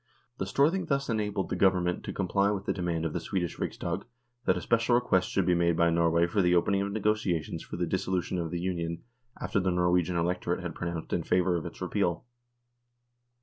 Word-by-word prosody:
The 95 Hz, -, -2 dB
Storthing 160 Hz, -, +2 dB
thus 140 Hz, -2 st, 0 dB
enabled 105 Hz, -3 st, -1 dB
the -, -, -1 dB
Government 90 Hz, -2 st, +2 dB
to -, -, -3 dB
comply 100 Hz, +1 st, +1 dB
with 100 Hz, -2 st, -2 dB
the -, -, 0 dB
demand 85 Hz, -3 st, -2 dB
of 80 Hz, -, -2 dB
the -, -, -1 dB
Swedish 85 Hz, 0 st, -3 dB
Riksdag -, -, -3 dB, 0.4 s
that -, -, +3 dB
a -, -, -3 dB
special 115 Hz, +1 st, +2 dB
request 95 Hz, -7 st, +2 dB
should 95 Hz, -, +1 dB
be 90 Hz, -, +3 dB
made 85 Hz, -1 st, +2 dB
by 85 Hz, 0 st, +4 dB
Norway 85 Hz, 0 st, +3 dB
for 100 Hz, +4 st, +1 dB
the 90 Hz, -1 st, +3 dB
opening 95 Hz, +3 st, +2 dB
of 100 Hz, 0 st, -2 dB
negotiations 100 Hz, -6 st, 0 dB
for -, -, -7 dB
the 90 Hz, -, 0 dB
dissolution 90 Hz, 0 st, -1 dB
of 85 Hz, -1 st, -2 dB
the 85 Hz, +1 st, -3 dB
Union 85 Hz, -2 st, -3 dB, 0.4 s
after -, -, 0 dB
the 95 Hz, 0 st, +1 dB
Norwegian 90 Hz, 0 st, +2 dB
electorate 90 Hz, +1 st, -1 dB
had 90 Hz, -2 st, -4 dB
pronounced 85 Hz, -1 st, -4 dB
in -, -, +1 dB
favour 90 Hz, 0 st, +2 dB
of 85 Hz, 0 st, -2 dB
its 85 Hz, -, -11 dB
repeal. 90 Hz, 0 st, -1 dB
90 Hz, 205 wpm, -29 LUFS, 85-100 Hz, 0.4 s, by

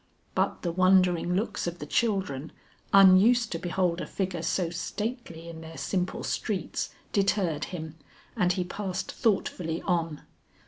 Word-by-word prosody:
But -, -, 0 dB
the 175 Hz, -, 0 dB
wondering 180 Hz, -1 st, +3 dB
looks 200 Hz, -2 st, -1 dB
of 175 Hz, 0 st, -3 dB
the 150 Hz, -, -6 dB
children 175 Hz, -, 0 dB, 0.4 s
unused 200 Hz, +5 st, +6 dB
to 165 Hz, -, -2 dB
behold 180 Hz, -1 st, 0 dB
a -, -, -5 dB
figure 185 Hz, -4 st, -3 dB
so 170 Hz, 0 st, 0 dB
stately 185 Hz, -2 st, -5 dB
in 165 Hz, -1 st, -8 dB
their 160 Hz, 0 st, -10 dB
simple 180 Hz, -2 st, -2 dB
streets 195 Hz, -6 st, -2 dB, 0.2 s
deterred 195 Hz, -6 st, +1 dB
him 160 Hz, -3 st, -7 dB, 0.4 s
and 180 Hz, -6 st, +3 dB
he 180 Hz, -, -1 dB
passed 190 Hz, 0 st, -4 dB
thoughtfully 175 Hz, -6 st, 0 dB
on. 165 Hz, -5 st, -1 dB
180 Hz, 140 wpm, -28 LUFS, 165-195 Hz, 0.4 s, unused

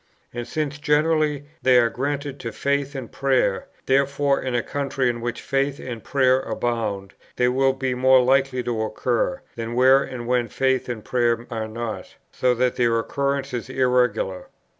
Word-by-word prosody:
And 120 Hz, 0 st, -5 dB
since, 150 Hz, +1 st, -3 dB
generally, 150 Hz, -1 st, +1 dB, 0.2 s
they 130 Hz, -1 st, +5 dB
are 120 Hz, -1 st, +4 dB
granted 140 Hz, +1 st, -3 dB
to 115 Hz, -, -5 dB
faith 140 Hz, +3 st, -1 dB
and 130 Hz, -4 st, -6 dB
prayer, 130 Hz, -8 st, +1 dB, 0.2 s
therefore 140 Hz, +1 st, +2 dB
in 130 Hz, -2 st, -2 dB
a 120 Hz, -, +1 dB
country 140 Hz, -2 st, -1 dB
in 120 Hz, 0 st, -7 dB
which 120 Hz, 0 st, -4 dB
faith 140 Hz, +1 st, -1 dB
and 120 Hz, -4 st, -7 dB
prayer 130 Hz, -2 st, +3 dB
abound, 105 Hz, -7 st, -3 dB, 0.2 s
they 125 Hz, -, +2 dB
will 135 Hz, +1 st, +2 dB
be 130 Hz, -1 st, -2 dB
more 130 Hz, +1 st, +5 dB
likely 130 Hz, 0 st, +2 dB
to 120 Hz, -2 st, -2 dB
occur, 120 Hz, -, -1 dB
than 115 Hz, 0 st, -4 dB
where 130 Hz, +2 st, +6 dB
and 125 Hz, -3 st, -6 dB
when 125 Hz, -1 st, +1 dB
faith 130 Hz, +3 st, 0 dB
and 115 Hz, -3 st, -5 dB
prayer 120 Hz, -1 st, +1 dB
are 110 Hz, -1 st, -3 dB
not; 115 Hz, 0 st, -6 dB, 0.2 s
so 125 Hz, -1 st, +1 dB
that 125 Hz, +1 st, 0 dB
their 120 Hz, -2 st, +2 dB
occurrence 140 Hz, +3 st, -2 dB
is 120 Hz, +1 st, -4 dB
irregular. 125 Hz, -7 st, +1 dB
130 Hz, 170 wpm, -23 LUFS, 120-140 Hz, 0.2 s, where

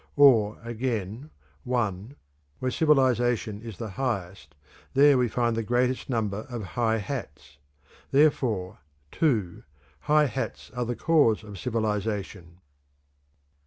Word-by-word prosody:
Or, 115 Hz, -7 st, +5 dB
again: 115 Hz, +1 st, -4 dB, 0.3 s
(1) 120 Hz, -1 st, -2 dB, 0.4 s
Where 130 Hz, 0 st, -2 dB
civilization 125 Hz, -8 st, +2 dB
is 115 Hz, -5 st, -8 dB
the 110 Hz, -1 st, -6 dB
highest, 100 Hz, -, -4 dB, 0.4 s
there 145 Hz, +1 st, +6 dB
we 125 Hz, -1 st, +2 dB
find 120 Hz, 0 st, 0 dB
the 115 Hz, -, -1 dB
greatest 125 Hz, +4 st, 0 dB
number 110 Hz, -4 st, -2 dB
of 120 Hz, -3 st, -5 dB
high 115 Hz, -2 st, +1 dB
hats; 75 Hz, -, -7 dB, 0.5 s
therefore 125 Hz, -10 st, +1 dB, 0.3 s
(2) 110 Hz, -, 0 dB, 0.4 s
high 150 Hz, -, +3 dB
hats 130 Hz, -4 st, -5 dB
are 125 Hz, -1 st, -3 dB
the 120 Hz, +1 st, -3 dB
cause 145 Hz, -10 st, +3 dB
of 100 Hz, -3 st, -10 dB
civilization. 105 Hz, -6 st, -3 dB
115 Hz, 115 wpm, -26 LUFS, 105-130 Hz, 0.5 s, there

